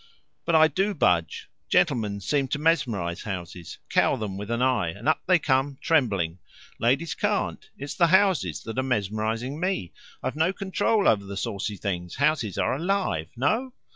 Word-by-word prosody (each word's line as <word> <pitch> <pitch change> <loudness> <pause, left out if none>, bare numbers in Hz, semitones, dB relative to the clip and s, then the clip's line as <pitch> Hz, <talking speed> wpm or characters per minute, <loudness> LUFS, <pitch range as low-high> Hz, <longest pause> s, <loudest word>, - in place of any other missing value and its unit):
"But 170 - +2
I 160 0 +7
do 195 +5 -1
budge. 85 - +1 0.2
Gentlemen 120 - +1
seem 135 +7 0
to 145 - -2
mesmerize 125 - 0
houses 90 -4 -6
cow - - +3
them 105 -3 -4
with 105 +2 -6
an 115 0 -1
eye, 130 -9 +2
and 100 - -7
up 155 - +3
they 185 0 +6
come, 135 -2 0
trembling. 100 - +1 0.4
Ladies 135 +8 +1
can't. - - -2
It's 140 +1 -5
the 170 - +3
houses 175 - +2
that 115 +3 -4
are - - +3
mesmerizing 115 +3 -2
me. 180 - -2 0.3
I've 130 - -2
no 160 +4 +2
control 200 +2 +1
over 100 -2 +3
the 100 0 -6
saucy 105 -1 -3
things. 90 -3 -4
Houses 130 - +1
are - - +1
alive. 155 - -1
No?" 220 - 0
130 Hz, 170 wpm, -26 LUFS, 100-160 Hz, 0.4 s, I